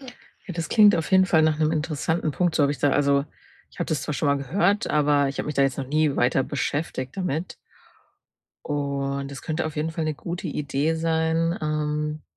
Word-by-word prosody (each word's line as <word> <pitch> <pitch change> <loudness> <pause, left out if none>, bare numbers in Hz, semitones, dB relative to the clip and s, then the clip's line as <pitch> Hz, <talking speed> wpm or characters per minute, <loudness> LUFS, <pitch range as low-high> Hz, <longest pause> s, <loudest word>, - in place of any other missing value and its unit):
Ja, 270 - -12 0.5
das 165 -2 -4
klingt 210 -4 +6
auf 165 - -3
jeden 190 0 +6
Fall 160 -3 +4
nach 155 -1 +2
'nem 155 0 +2
interessanten 155 +1 -1
Punkt, 175 +2 0
so 145 - +3
habe 140 - +1
ich - - -7
da 145 - +2
also, 140 0 +2 0.5
ich - - -19
habe 170 - -1
das 150 -4 -1
zwar 150 - -3
schon 155 - -1
mal 140 - +3
gehört, 180 +9 +1
aber 145 -2 +3
ich 135 - -6
habe - - -2
mich 150 - -3
da 140 - +3
jetzt 135 0 0
noch 135 - -3
nie 150 0 +1
weiter 125 +2 +2
beschäftigt 140 -1 -3
damit. 180 -2 -3 1.1
Und 140 -1 -2
es 140 - -8
könnte 155 0 -2
auf 155 - -7
jeden 155 +2 -1
Fall 160 0 -3
'ne 155 -1 -1
gute 170 +4 -5
Idee 145 +2 -1
sein, 160 +1 0
ähm, 150 0 -2
150 Hz, 215 wpm, -24 LUFS, 140-160 Hz, 1.1 s, klingt